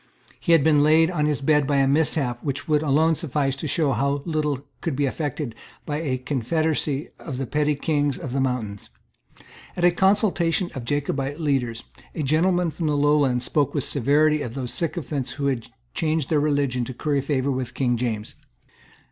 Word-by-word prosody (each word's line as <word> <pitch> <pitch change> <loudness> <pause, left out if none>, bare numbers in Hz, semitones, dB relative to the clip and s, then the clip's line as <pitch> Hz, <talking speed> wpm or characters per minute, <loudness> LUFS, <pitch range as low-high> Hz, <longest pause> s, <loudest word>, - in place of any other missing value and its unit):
He 170 - +2
had 165 -4 +5
been 150 -1 +4
laid 160 +3 +4
on 150 -4 0
his 150 -2 -1
bed 150 0 +3
by 145 - +1
a 135 -1 +3
mishap 140 -4 0
which 140 -1 -3
would 150 -2 +2
alone 155 +2 +3
suffice 140 -3 -1
to 155 - -4
show 150 -1 +1
how 140 +3 0
little 150 -4 -1 0.2
could 165 -5 -2
be 145 +1 +1
effected 145 -2 -3 0.3
by 145 - -2
a 135 -5 -1
confederacy 145 +3 -1
of 135 -6 -6
the 135 - -2
petty 150 +3 +1
kings 145 -1 0
of 130 - -6
the 135 +1 0
mountains. 115 -6 -3 0.9
At 175 - -2
a 175 - +6
consultation 185 -2 +2
of 135 - -5
the - - -10
Jacobite 140 +1 -2
leaders, 130 -7 -1 0.3
a 155 - -2
gentleman 170 +4 +2
from 160 0 -3
the 150 -1 +1
Lowlands 145 -4 +2
spoke 145 -2 +1
with 140 - +1
severity 150 +3 +2
of 120 -4 -5
those 130 -3 -3
sycophants 155 -5 -3
who 140 - -4
had 130 -5 -1 0.3
changed 155 -3 -1
their 155 - +4
religion 140 -4 +1
to 130 - -7
curry 145 +1 0
favour 140 -1 0
with 130 -1 -4
King 125 -2 +1
James. 110 -3 -3
145 Hz, 190 wpm, -24 LUFS, 130-155 Hz, 0.9 s, a